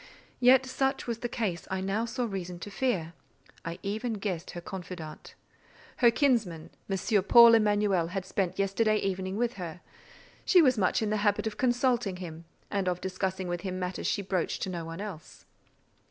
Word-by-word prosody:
Yet, 255 +1 +6
that 260 - -8
such 270 +1 0
was 235 -1 -3
the 240 - -3
case 205 -9 -3
I 190 - -1
now 195 +4 -1
saw 245 +1 -2
reason 185 -5 -5
to 205 - -7
fear; 195 -8 -1 0.5
I 165 +1 -5
even 215 +4 -2
guessed 195 -5 -4
her 175 - -6
confidant. 175 -3 -8 0.6
Her 240 - +6
kinsman, 225 - +1 0.2
M. 195 +1 +1
Paul 235 +1 +9
Emanuel, 205 -5 +3
had 185 +2 -4
spent 190 -1 -2
yesterday 205 +3 +2
evening 190 -1 -2
with 240 0 -1
her: 170 0 -6 0.6
she 370 - +5
was 260 -6 +5
much 210 +1 +1
in 210 - -1
the 215 - +1
habit 205 +1 +1
of 215 -1 -3
consulting 245 -5 +1
him, 170 -2 -8 0.3
and 195 -3 0
of 180 -1 -2
discussing 190 0 -3
with 175 0 -3
him 185 -1 -4
matters 180 0 -3
she 200 - 0
broached 185 -3 -1
to 190 - -3
no 170 -2 -4
one 165 +3 -6
else. 195 -7 -9
195 Hz, 185 wpm, -29 LUFS, 180-230 Hz, 0.6 s, Paul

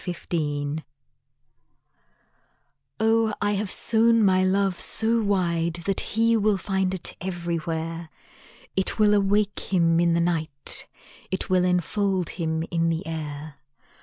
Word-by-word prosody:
After 180 - -1 0.2
Parting 145 -1 -2 2.2
Oh, 225 0 +2
I 205 0 +1
have 205 0 -1
sown 230 +2 +3
my 185 -1 +4
love 190 -1 +1
so 230 +1 +2
wide 170 -5 0
That 195 -1 0
he 230 +1 +1
will 215 -2 +2
find 190 -1 -1
it 180 - -4
everywhere; 165 -2 -3 0.7
It 190 - 0
will 210 -1 +4
awake 205 0 +2
him 165 -3 +3
in 170 0 +3
the - - +2
night, 160 -5 -2 0.4
It 190 0 -3
will 185 -1 +4
enfold 180 +1 0
him 160 -2 -2
in 165 -1 +1
the 165 +3 -2
air. 150 -2 -6
185 Hz, 130 wpm, -25 LUFS, 165-205 Hz, 2.2 s, my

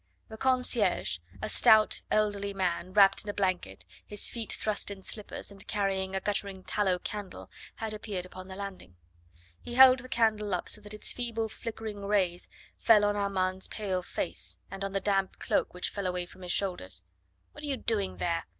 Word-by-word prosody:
The 220 - -8
concierge, 245 - +2 0.2
a - - 0
stout, 215 -1 +6
elderly 200 -2 0
man, 180 -1 -1
wrapped 195 -1 +6
in 210 - -7
a 205 - -3
blanket, 175 - -1 0.2
his 205 -1 -1
feet 230 -3 -4
thrust 215 -1 -1
in 195 -1 -8
slippers, 210 0 -5
and 195 -1 -10
carrying 195 -2 -1
a - - +1
guttering 200 -1 -2
tallow 190 -3 +1
candle, 205 +1 -7 0.2
had 220 -1 -4
appeared 205 -4 -4
upon 185 0 -10
the 190 - -8
landing. 195 - -8 0.7
He 240 - -7
held 260 0 +9
the 255 +1 -10
candle 215 -4 +2
up 180 - -4
so 210 - +1
that 205 0 -6
its 210 - +2
feeble 230 -2 -2
flickering 220 -2 -6
rays 190 -4 0 0.3
fell 215 -3 +6
on 205 0 +1
Armand's 190 -2 0
pale 190 -4 -2
face, 175 - -2
and 195 0 -5
on 195 0 -3
the 195 - +1
damp 195 -2 0
cloak - - 0
which 180 - -2
fell 200 -2 -3
away 180 -1 -2
from 185 - -16
his 180 -1 -3
shoulders. 185 -2 -1 0.5
"What 295 - -11
are - - -3
you 275 -2 -1
doing 210 -6 -1
there?" 170 -1 -1
200 Hz, 185 wpm, -30 LUFS, 185-215 Hz, 0.7 s, held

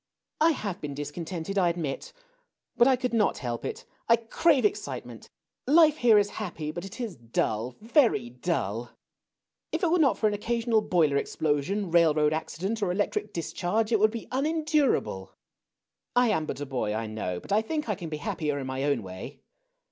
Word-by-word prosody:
I 325 +1 +5
have 200 - -5
been 145 -2 -5
discon 145 +3 -5
tented, 185 +3 -2
I 180 -2 +4
admit. 170 - -4 0.6
But 240 - +5
I 265 - +5
could 250 -1 -3
not 215 -3 +2
help 120 -2 -4
it. - - -5 0.2
I 230 - +8
crave 260 +6 +2
excitement. 415 0 -3 0.4
Life 310 +1 +6
here 235 -5 +5
is 205 0 +2
happy; 160 -6 -4
but 175 +2 -6
it 195 +5 -9
is 230 -7 -4
dull 115 0 -2
— - - -34
very 225 - +2
dull. 120 - -2 0.8
If - - -2
it 335 - +3
were 355 - +3
not 280 -5 +4
for - - -1
an 210 - 0
occasional 230 +1 +1
boiler 160 -8 +2
explosion, 160 +7 -1
railroad 155 -3 +4
accident, 190 +7 -3
or 190 -3 +1
electric 205 +2 -1
discharge, 210 +5 -1
it 220 - +4
Avould 215 +1 +5
be 230 +1 -7
un 270 +4 +1
endurable. 305 - 0 0.8
I 245 -1 +4
am 160 -6 0
but - - -4
a - - -2
boy, 120 -6 -2
I 115 +1 -2
know; 105 -5 -4
blit - - -12
I 210 +2 +4
think 300 +6 -3
I 210 - +1
can 170 -4 -6
be 155 - -4
happier 150 0 -2
in 135 - -4
my 130 +1 -3
own 140 -6 +1
way. 95 +9 -9
180 Hz, 195 wpm, -27 LUFS, 145-230 Hz, 0.8 s, I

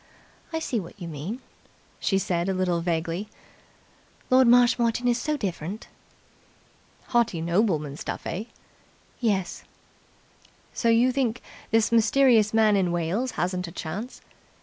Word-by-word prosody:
"I 325 - -2
see 265 -7 -1
what 180 +2 -10
you 175 - -6
mean," 165 - -6 0.6
she 195 - +1
said 175 -1 -1
a 190 - 0
little 180 -2 0
vaguely. 170 +3 -2 1.0
"Lord 255 -1 +6
Marshmoreton 240 0 +4
is 240 0 +2
so 305 -1 -1
different." 190 - -5 1.2
"Haughty 235 -8 +2
nobleman 165 -4 0
stuff, - - -5
eh?" 195 +6 -3 0.7
"Yes." 200 -6 -1 1.1
"So 235 - 0
you 235 +3 +4
think 255 -3 0 0.3
this 225 0 +2
mysterious 230 -1 +4
man 220 -2 +4
in 185 -3 +1
Wales 175 +9 -1
hasn't 180 0 -2
a - - -8
chance?" 190 +9 -6
210 Hz, 125 wpm, -25 LUFS, 175-235 Hz, 1.2 s, Lord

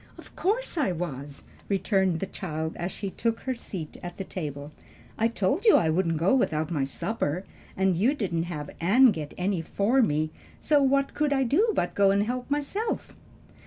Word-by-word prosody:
"Of - - -14
course 420 -2 0
I 270 -11 +2
was," 145 -5 -5 0.3
returned 190 -3 +1
the - - 0
child 160 -5 -4
as 175 +2 -3
she 200 -2 -5
took 230 +3 -1
her 260 - -2
seat 185 -9 -7
at 175 0 -7
the 195 - -3
table. 150 -6 -6 0.4
"I 225 - +2
told 230 - 0
you 445 - +7
I 160 -2 +3
wouldn't 165 -1 +1
go 170 +8 +3
without 160 - +1
my 145 -5 0
supper, 175 +2 -2 0.3
and 190 -1 +2
you 230 - +2
didn't 175 - -1
have 150 -4 -5
Ann 230 +9 +6
get 150 -6 -6
any 185 -1 0
for 210 +10 +2
me; 155 -6 +1 0.3
so 295 -2 +3
what 275 0 +2
could 300 -1 0
I 270 -1 +3
do 380 - +3
but 175 - 0
go 200 -1 +4
and 200 +1 +3
help 245 +4 -3
myself?" 295 +11 -2
190 Hz, 190 wpm, -27 LUFS, 165-255 Hz, 0.4 s, you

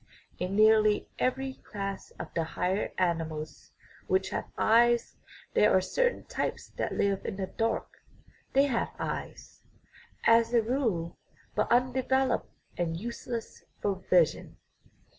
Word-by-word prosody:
In 180 +2 -2
nearly 215 0 +5
every 265 +1 0
class 195 -1 -5
of - - -7
the 165 - 0
higher 180 +5 -1
animals 165 -4 -2 0.4
which 380 - +1
have - - -3
eyes 235 +1 +4 0.4
there 210 - +5
are - - +5
certain 485 - 0
types - - -3
that - - -3
live 200 -1 0
in 210 - -4
the 190 -1 -2
dark; 225 +4 -2 0.5
they 275 - +5
have 250 -5 0
eyes, - - -6 0.6
as 230 +1 +4
a 230 - +5
rule, 220 -9 -1 0.3
but - - 0
undeveloped 255 +1 +2 0.3
and 165 -2 -1
useless 235 +1 -6 0.2
for 200 -2 -1
vision. 175 -3 +2
215 Hz, 125 wpm, -29 LUFS, 185-240 Hz, 0.6 s, nearly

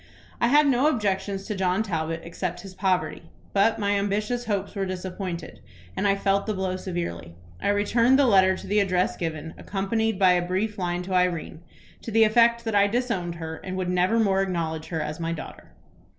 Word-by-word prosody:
"I 235 - +4
had 295 +4 +5
no 270 +1 +3
objections 200 -6 -1
to 215 - -3
John 190 +1 +1
Talbot 165 -4 -3
except 175 +1 -4
his 195 0 -10
poverty; 180 -4 -1 0.2
but 205 +3 +3
my 200 -1 0
ambitious 210 +4 -1
hopes 200 -3 -2
were 195 - -2
disappointed, 180 -2 -5 0.4
and 205 - 0
I 195 - +3
felt 200 +1 0
the 215 - -1
blow 190 -1 -2
severely. 170 - -5 0.3
I - - -1
returned 230 +5 +3
the 280 - +4
letter 190 -4 +4
to - - -10
the 210 +1 +2
address 185 -2 +1
given, 160 -1 -4
accompanied 220 +2 -1
by 185 -2 +5
a 180 0 +3
brief 195 +4 -2
line 175 -1 -1
to 185 +1 -5
Irene, 180 -3 0 0.4
to - - -7
the 225 0 +5
effect 235 +2 +4
that 225 -2 -3
I 200 0 +5
disowned 205 -7 -1
her, 160 -1 -6
and 185 0 -6
would 185 -1 -2
never 180 +5 +2
more 195 -3 +3
acknowledge 165 -4 -2
her 160 -2 -3
as 150 +1 -5
my 165 0 -2
daughter. 160 - -9
190 Hz, 195 wpm, -25 LUFS, 175-210 Hz, 0.4 s, had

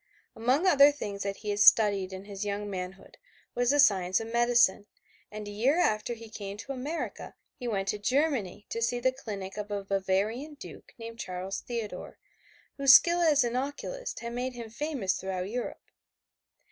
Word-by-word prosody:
Among 255 +9 +1
other 290 -5 +7
things 205 -9 -6
that 200 0 -2
he 210 - 0
had 205 - -2
studied 200 -3 +5
in 190 +1 -8
his 200 0 -6
young 205 0 -3
manhood 190 -1 -7 0.3
was 245 0 +1
the 290 - +3
science 190 -8 +4
of 225 0 -6
medicine, 235 -4 +3 0.4
and 210 0 -7
a - - -6
year 245 +10 +2
after 235 -7 +1
he 230 0 -11
came 200 -2 -7
to 250 +6 -7
America 275 +5 -5 0.2
he 245 - -5
went 195 -4 -1
to 210 - -2
Germany 250 - 0
to 230 - -3
see 240 +1 0
the 260 +2 +2
clinic 205 -7 -7
of 210 0 -5
a 205 -1 -3
Bavarian 200 +9 -1
duke - - -12
named 230 0 -9
Charles 185 -1 -4
Theodore, 230 -4 -6 0.6
whose 275 -1 +8
skill 345 0 +5
as 305 -5 +4
an 240 0 -2
occulist 285 - -4
had 235 0 -5
made 250 +1 -3
him 235 -2 -8
famous 255 -6 -2
throughout 185 -1 -3
Europe. 245 +1 -5
225 Hz, 180 wpm, -29 LUFS, 200-260 Hz, 0.6 s, whose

